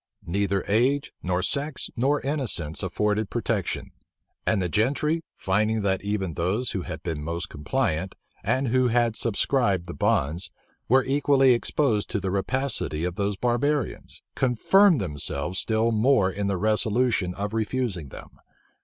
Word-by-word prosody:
Neither 100 +1 0
age, 130 +7 +2
nor 90 0 -1
sex, 140 +3 -2
nor 140 +5 +1
innocence 120 - -1
afforded 105 +2 0
protection; - - -2 0.6
and 110 - +2
the 90 - 0
gentry, 140 - +1
finding 105 +3 0
that 95 -1 +1
even 100 -4 -2
those 95 +10 -1
who 95 - -2
had - - -7
been 80 -4 -3
most 85 +2 -3
compliant, 85 - -2 0.3
and 130 -1 +1
who 130 +1 +3
had 120 -1 +2
subscribed 110 -5 +1
the - - -7
bonds, 85 +7 0 0.4
were 130 +2 +5
equally 135 -1 +4
exposed 120 -2 0
to 105 - -1
the 95 -1 -2
rapacity 100 - -1
of 90 0 -1
those 100 +2 -1
barbarians, 125 +4 -1
confirmed 155 - +4
themselves 75 0 -2
still 110 +1 +1
more 110 -3 +3
in 100 +1 -2
the 100 -1 0
resolution 110 -2 +1
of 100 +2 -4
refusing 110 - -2
them. - - -11
105 Hz, 145 wpm, -25 LUFS, 95-130 Hz, 0.6 s, were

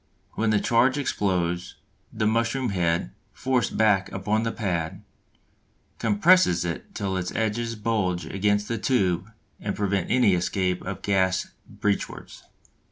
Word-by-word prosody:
When 110 0 0
the 105 -1 +3
charge 125 +5 +3
explodes, 90 -9 -1 0.4
the 110 -1 -1
mushroom 115 +3 +1
head 85 -8 0 0.2
forced 130 -2 0
back 105 -3 +3
upon 105 +3 0
the 115 0 -1
pad 95 -3 -3 1.0
compresses 110 - +4
it 85 -2 -5
till 95 -2 -2
its 90 0 -3
edges 115 +1 -1
bulge 105 -5 -1
against 105 +1 0
the 115 -2 -2
tube 95 -6 +1 0.3
and 100 - -3
prevent 100 -3 -1
any 120 -6 +4
escape 90 +1 0
of 95 0 -5
gas 95 -2 +1 0.2
breechwards. 105 -1 -3
100 Hz, 130 wpm, -25 LUFS, 95-115 Hz, 1.0 s, compresses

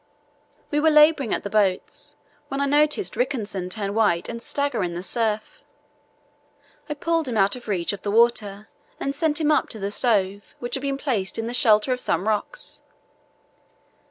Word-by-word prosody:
We 295 - +2
were 320 +1 +4
labouring 300 -5 +5
at - - -1
the 200 - -4
boats 200 -4 0 0.3
when 275 - -4
I 280 - +2
noticed 300 +7 +2
Rickenson 215 -8 -2
turn 200 0 -3
white 205 -6 +2
and 235 0 -6
stagger 280 -3 0
in 175 -1 -3
the 175 - -5
surf. 220 0 -2 1.3
I 300 - -2
pulled 330 +1 0
him 235 -3 -2
out 195 +2 +3
of 245 -2 -11
reach 185 -3 -1
of 200 - -7
the 205 - -3
water 215 -2 +2 0.3
and 275 - -2
sent 295 +1 0
him 310 -1 +2
up 300 - +2
to - - -7
the 200 0 -3
stove, 205 -4 0
which 240 - -6
had 265 - 0
been 275 0 -2
placed 240 -9 -1
in 225 - -2
the 235 - -4
shelter 215 -1 +4
of 250 - -3
some 210 - -1
rocks. 220 - -3
230 Hz, 185 wpm, -23 LUFS, 205-280 Hz, 1.3 s, labouring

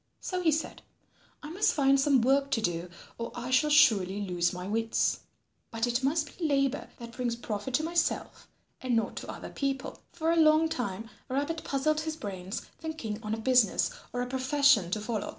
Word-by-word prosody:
So 365 -1 -3
he 330 -3 +3
said, 315 +1 -3 0.6
"I 300 - -7
must 385 +5 +2
find 275 -1 +4
some 270 -4 +3
work 275 +2 +3
to - - +2
do 175 -2 -2 0.3
or 230 - -4
I 245 +1 -5
shall 300 +4 +4
surely 205 -10 +4
lose 180 -4 0
my 180 0 -6
wits. 225 +2 0 0.5
But 225 0 -1
it 240 +2 -1
must 295 +1 0
be 330 - 0
labour 275 -2 0
that 235 -1 -9
brings 240 -1 -2
profit 235 +1 -3
to 310 - +1
myself 335 +1 -1 0.3
and 255 -2 0
not 225 - 0
to - - -5
other - - -8
people." 275 -2 -3
For 325 -1 0
a - - +3
long 310 +1 +5
time 225 -6 -4 0.2
Rabbit 290 +5 -2
puzzled 305 +3 0
his 315 0 -3
brains 190 - -5 0.2
thinking 310 -10 -5
on 215 -1 -2
a - - -7
business 245 -3 +3 0.2
or 245 0 -2
a - - -4
profession 260 -5 +3
to 215 - -1
follow. 215 -1 -3
255 Hz, 190 wpm, -29 LUFS, 220-300 Hz, 0.6 s, long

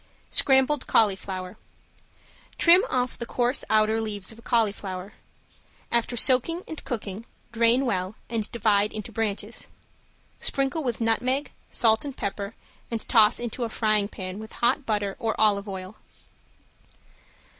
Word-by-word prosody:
~SCRAMBLED 265 +1 +3
CAULIFLOWER~ 190 -2 +1 1.0
Trim 350 +2 +7
off 250 -1 -1
the 235 - -5
coarse 245 +2 0
outer 220 +1 +3
leaves 205 -3 -3
of 220 - -14
a - - -13
cauliflower. 205 -4 -1 0.8
After 235 +1 +1
soaking 275 +9 +2
and 315 - -7
cooking, 215 -2 -5 0.2
drain 235 +3 +3
well 190 -3 -2
and 225 -2 -3
divide 210 -3 +2
into 215 +1 -6
branches. 220 0 -3 0.7
Sprinkle 275 +3 0
with 240 -3 -2
nutmeg, 255 +5 0 0.2
salt 220 -1 +3
and 280 -3 -6
pepper 200 +1 -4 0.3
and 230 -2 -4
toss 220 -4 +5
into 240 +1 -4
a 230 - -2
frying 215 -2 +1
pan 185 -1 -7
with 220 0 -9
hot 250 +3 +1
butter 205 -3 -1
or 225 -1 -2
olive 205 -1 +3
oil. 190 +1 -7
225 Hz, 135 wpm, -25 LUFS, 205-245 Hz, 1.0 s, Trim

